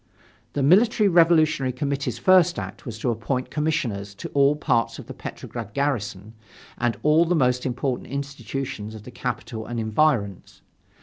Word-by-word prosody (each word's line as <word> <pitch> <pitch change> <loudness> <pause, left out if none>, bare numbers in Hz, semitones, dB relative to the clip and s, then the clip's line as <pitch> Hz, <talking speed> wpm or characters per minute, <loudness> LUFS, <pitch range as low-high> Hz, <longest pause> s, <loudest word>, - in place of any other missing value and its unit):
The 140 - 0
Military 210 - +5
Revolutionary 165 -6 +4
Committee's 135 -2 -2
first 180 +6 +4
act 155 - -7
was 110 -2 -5
to 120 +2 0
appoint 125 +3 -3
commissioners 115 -10 -2
to - - -7
all 140 +1 +3
parts 120 -6 0
of - - -9
the - - -8
Petrograd 110 -4 -8
garrison 110 -7 -2 0.5
and 120 -1 0
all 155 +2 +5
the 175 +1 +1
most 125 -3 +1
important 125 +1 -3
institutions 135 -5 -5
of 105 - -10
the 125 - -10
capital 115 -2 -5
and 120 -1 -3
environs. 110 - 0
130 Hz, 150 wpm, -24 LUFS, 115-150 Hz, 0.5 s, Military